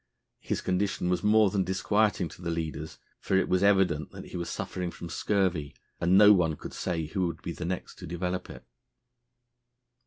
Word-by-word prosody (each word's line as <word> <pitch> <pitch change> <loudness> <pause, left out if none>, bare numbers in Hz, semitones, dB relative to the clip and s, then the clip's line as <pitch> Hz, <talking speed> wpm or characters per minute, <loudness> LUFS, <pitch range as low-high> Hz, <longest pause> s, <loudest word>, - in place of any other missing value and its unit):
His - - -3
condition 95 -1 0
was 90 - +1
more 105 -1 +5
than 100 -2 +1
disquieting 95 +1 +1
to 85 - -13
the 85 - -3
leaders, 80 -1 -4 0.2
for 95 - +1
it 95 - +2
was 90 0 +2
evident 95 -6 +2
he - - -10
was 85 -1 -3
suffering 90 -1 -4
from 85 0 -8
scurvy, 90 -9 0 0.2
and 90 +2 +4
no 105 0 +9
one 80 -5 +2
could - - -9
say 85 -3 -2
who 90 +3 -1
would 85 -1 -6
be 85 - -3
the 85 +1 -5
next 90 +1 -5
to - - -8
develop 90 +2 -3
it. - - -11
90 Hz, 185 wpm, -28 LUFS, 85-95 Hz, 0.2 s, no